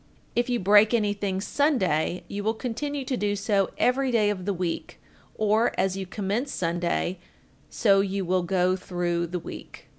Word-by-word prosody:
If 240 +1 +1
you 245 -1 +1
break 210 +4 +5
anything 205 -3 -1
Sunday, 190 - +1
you 205 0 -5
will 220 +2 0
continue 270 +4 -3
to 260 0 -1
do 205 -3 0
so 200 -1 +1
every 265 +1 +2
day 215 -3 +3
of 185 -3 -5
the 200 - 0
week, 180 -2 -4 0.4
or 215 +2 +2
as 190 -1 +1
you 195 -1 -5
commence 210 +8 -2
Sunday, 175 +1 -1 0.5
so 200 -3 +3
you 195 -1 -2
will 185 +1 +1
go 180 +1 +1
through 175 -2 -2
the 180 +2 -3
week. 170 - -10
200 Hz, 170 wpm, -26 LUFS, 185-225 Hz, 0.5 s, break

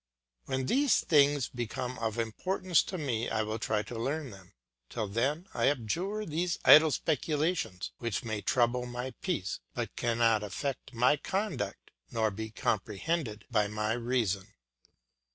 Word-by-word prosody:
When 130 0 -1
these 270 - +3
things 145 -4 +4
become 125 +1 -4
of 110 -1 -2
importance 175 - +1
to 185 - -4
me 120 -7 -1
I 110 -1 0
will 110 +1 -3
try 105 -1 0
to 115 0 -7
learn 140 +2 -2
them; 95 -3 -14 0.4
till 110 - -3
then 135 - 0
I - - +1
abjure 170 - -1
these 170 +2 -1
idle 155 +1 +9
speculations, 155 - -1
which 115 -3 -2
may 110 -3 -3
trouble 125 +1 +1
my 125 +2 -4
peace, 165 - -2 0.2
but - - -3
cannot 115 -2 +2
affect 120 +6 -4
my 125 +5 +4
conduct 190 -3 -3 0.2
nor 110 -2 +1
be 110 +3 -5
comprehended 110 - -2
by 105 -3 +3
my 105 +1 -1
reason. 115 -5 -1
120 Hz, 145 wpm, -31 LUFS, 110-150 Hz, 0.4 s, idle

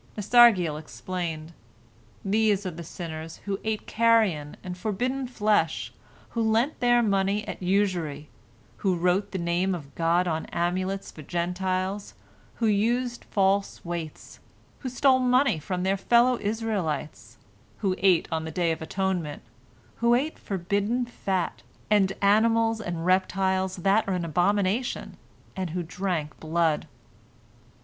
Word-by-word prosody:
Nasargiel 205 -8 +5
explained: 160 +3 -5 0.7
"These 205 -1 +2
are 185 - -2
the 170 +1 -8
sinners 160 -1 -7
who 200 -1 -2
ate 220 -1 -2
carrion 215 -10 +2
and 180 -1 -5
forbidden 245 +7 -2
flesh, 215 -4 0 0.4
who 230 - -2
lent 225 +6 +1
their 240 -1 +4
money 200 0 +1
at - - -6
usury, 180 -6 0 0.5
who 190 -3 +1
wrote 180 +4 +1
the 190 - -4
Name 175 +2 0
of 140 -5 -10
God 170 +2 +2
on 160 -1 -2
amulets 185 +3 -2
for 155 - -11
Gentiles, 185 +4 -2 0.4
who 230 - -1
used 235 +4 +1
false 195 -1 0
weights, 170 -3 -6 0.4
who 260 - -4
stole 260 +1 +3
money 250 - +3
from 180 +4 -3
their 190 +1 +1
fellow 240 +4 +3
Israelites, 205 -9 -3 0.4
who 195 -3 +1
ate 185 -3 +4
on 160 -1 -1
the 160 - -5
Day 170 +1 0
of 160 - -4
Atonement, 180 -3 -2 0.5
who 235 +1 +4
ate 290 +6 -1
forbidden 200 +6 -1
fat, 190 -6 -2 0.3
and 195 -2 +4
animals 225 +2 +3
and 170 -4 -4
reptiles 190 0 +1
that 195 +4 +2
are 190 - 0
an 175 -2 -2
abomination, 200 - 0 0.4
and 185 -3 -3
who 175 +2 -3
drank 170 -3 -3
blood." 160 -1 0
190 Hz, 135 wpm, -26 LUFS, 170-220 Hz, 0.7 s, Nasargiel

